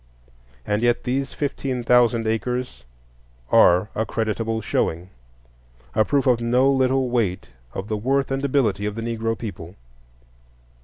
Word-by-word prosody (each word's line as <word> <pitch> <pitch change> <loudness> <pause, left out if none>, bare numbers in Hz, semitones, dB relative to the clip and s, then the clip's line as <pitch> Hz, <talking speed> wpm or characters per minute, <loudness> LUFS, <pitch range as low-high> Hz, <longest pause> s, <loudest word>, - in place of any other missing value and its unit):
And 105 +1 0
yet 120 0 +1
these 135 +2 -2
fifteen 135 -3 -3
thousand 120 -1 +3
acres 115 - -3 0.7
are 90 +4 +5
a 110 - -1
creditable 110 0 -2
showing,—a - - -4
proof 140 +2 +1
of 125 -3 +3
no 125 +3 +3
little 130 -1 +1
weight 105 - -1 0.2
of 95 - -4
the 110 - -2
worth 135 +5 0
and 135 +1 -2
ability 110 -8 +1
of 105 - -4
the 115 - -5
Negro 115 -1 -2
people. 95 -5 -8
115 Hz, 135 wpm, -22 LUFS, 100-125 Hz, 0.7 s, are